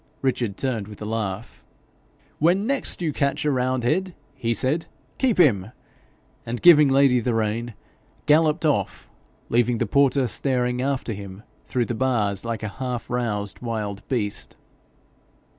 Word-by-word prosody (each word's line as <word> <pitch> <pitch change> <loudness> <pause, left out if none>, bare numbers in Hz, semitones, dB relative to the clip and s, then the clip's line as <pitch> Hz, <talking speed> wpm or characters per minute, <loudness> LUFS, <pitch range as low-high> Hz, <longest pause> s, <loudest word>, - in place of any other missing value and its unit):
Richard 120 -6 -1
turned 115 -7 -2
with 105 -1 -11
a 105 - -6
laugh. 105 - -4 0.8
'When 180 +6 +3
next 270 -8 0
you 155 -3 0
catch 140 +1 0
a 150 - +3
roundhead,' 130 +8 0 0.2
he 125 -4 -2
said, 130 +8 0 0.3
'keep 255 -5 +2
him;' 110 - +3 0.7
and 120 +1 -4
giving 150 -5 +7
Lady 135 -2 +4
the 120 0 -1
rein, 115 +1 -2 0.5
galloped 155 +2 +3
off, 150 -3 0 0.4
leaving 120 0 +2
the 120 - 0
porter 140 +3 +3
staring 125 0 -1
after 130 -3 -1
him 100 0 -9 0.2
through 125 -2 -1
the 120 - -3
bars 110 -5 0
like 115 -2 -4
a - - -1
half 125 -3 -4
roused 105 -5 -2
wild 105 -4 -4
beast. 110 -6 -2
125 Hz, 140 wpm, -23 LUFS, 110-140 Hz, 0.8 s, giving